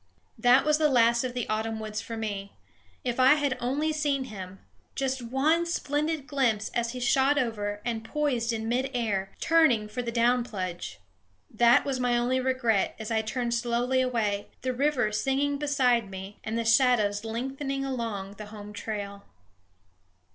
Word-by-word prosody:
That 245 Hz, +4 st, +5 dB
was 305 Hz, 0 st, +3 dB
the 305 Hz, -1 st, +4 dB
last 235 Hz, -2 st, +4 dB
of 250 Hz, -1 st, -4 dB
the 245 Hz, -, -2 dB
autumn 220 Hz, +1 st, -2 dB
woods 215 Hz, 0 st, -4 dB
for 230 Hz, -, -6 dB
me. 200 Hz, -3 st, -4 dB, 0.5 s
If 245 Hz, 0 st, -2 dB
I 260 Hz, +3 st, +7 dB
had 285 Hz, -3 st, 0 dB
only 290 Hz, +6 st, 0 dB
seen 290 Hz, -3 st, 0 dB
him 195 Hz, -6 st, -8 dB, 0.4 s
just 265 Hz, -1 st, -1 dB
one 275 Hz, +8 st, +1 dB
splendid 305 Hz, -2 st, -1 dB
glimpse 240 Hz, -7 st, 0 dB
as 235 Hz, 0 st, -2 dB
he 250 Hz, -, -5 dB
shot 265 Hz, +3 st, +3 dB
over 210 Hz, -5 st, -2 dB
and 230 Hz, -2 st, -2 dB
poised 245 Hz, -3 st, -1 dB
in 225 Hz, -1 st, -3 dB
mid 255 Hz, +3 st, 0 dB
air, 200 Hz, -5 st, -1 dB
turning 310 Hz, -10 st, +3 dB
for 230 Hz, +4 st, -4 dB
the 235 Hz, -1 st, -4 dB
down 240 Hz, +1 st, +3 dB
plunge! 185 Hz, -7 st, -5 dB, 0.5 s
That 235 Hz, +2 st, +4 dB
was 270 Hz, -2 st, -1 dB
my 245 Hz, -1 st, +2 dB
only 250 Hz, +2 st, +1 dB
regret 255 Hz, -5 st, +1 dB
as 220 Hz, +1 st, -6 dB
I 220 Hz, -1 st, +2 dB
turned 235 Hz, +1 st, -2 dB
slowly 240 Hz, +2 st, +1 dB
away, 220 Hz, -5 st, -1 dB, 0.2 s
the 255 Hz, 0 st, 0 dB
river 255 Hz, -4 st, +1 dB
singing 270 Hz, +6 st, 0 dB
beside 250 Hz, -7 st, +2 dB
me 190 Hz, +1 st, -8 dB
and 220 Hz, +1 st, -3 dB
the 230 Hz, -, -1 dB
shadows 225 Hz, -4 st, +3 dB
lengthening 270 Hz, +4 st, -3 dB
along 220 Hz, -7 st, -4 dB
the 210 Hz, -, -7 dB
home 210 Hz, -1 st, -10 dB
trail. 205 Hz, -1 st, -5 dB
240 Hz, 170 wpm, -27 LUFS, 220-265 Hz, 0.5 s, I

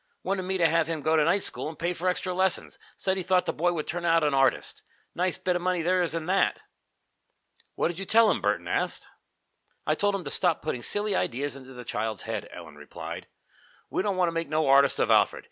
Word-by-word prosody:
Wanted 190 Hz, +1 st, -1 dB
me 190 Hz, +1 st, -2 dB
to 170 Hz, -, +3 dB
have 165 Hz, 0 st, +2 dB
him 160 Hz, -3 st, -3 dB
go 160 Hz, 0 st, +2 dB
to 155 Hz, -, +4 dB
night 180 Hz, +6 st, +2 dB
school -, -, -1 dB
and 160 Hz, -, -10 dB
pay 170 Hz, +2 st, -1 dB
for 180 Hz, +2 st, -1 dB
extra 180 Hz, 0 st, -2 dB
lessons. 185 Hz, 0 st, 0 dB, 0.2 s
Said 190 Hz, 0 st, -1 dB
he -, -, -1 dB
thought 180 Hz, 0 st, +2 dB
the -, -, -1 dB
boy 175 Hz, +3 st, +1 dB
would 160 Hz, -3 st, -3 dB
turn 175 Hz, +1 st, -4 dB
out 165 Hz, -1 st, +3 dB
an 150 Hz, -1 st, +2 dB
artist. 135 Hz, -1 st, +1 dB, 0.3 s
Nice 180 Hz, -2 st, 0 dB
bit 180 Hz, -1 st, -1 dB
of 175 Hz, -, -1 dB
money 180 Hz, -1 st, 0 dB
there 180 Hz, +2 st, +2 dB
is 170 Hz, -2 st, -1 dB
in 165 Hz, -1 st, -3 dB
that!" 190 Hz, +3 st, +1 dB, 1.2 s
"What -, -, +1 dB
did 175 Hz, +1 st, -6 dB
you 195 Hz, -, -4 dB
tell 225 Hz, +2 st, +5 dB
him?" -, -, -1 dB
Burton -, -, 0 dB
asked. -, -, -2 dB, 0.8 s
"I -, -, +2 dB
told 205 Hz, 0 st, +1 dB
him 195 Hz, -, -4 dB
to -, -, -5 dB
stop 175 Hz, -3 st, +1 dB
putting 125 Hz, -6 st, -3 dB
silly 205 Hz, -, +1 dB
ideas 140 Hz, 0 st, -1 dB
into 130 Hz, -1 st, -11 dB
the 125 Hz, -1 st, -10 dB
child's 110 Hz, -1 st, -3 dB
head," 110 Hz, -3 st, -4 dB
Ellen 80 Hz, -4 st, -11 dB
replied. 75 Hz, -, -8 dB, 0.6 s
"We -, -, 0 dB
don't 195 Hz, -1 st, -1 dB
want 180 Hz, -2 st, +3 dB
to -, -, -6 dB
make 165 Hz, -2 st, -3 dB
no 155 Hz, +1 st, +1 dB
artist 140 Hz, +1 st, +5 dB
of -, -, +1 dB
Alfred. -, -, +4 dB
170 Hz, 240 wpm, -27 LUFS, 150-185 Hz, 1.2 s, tell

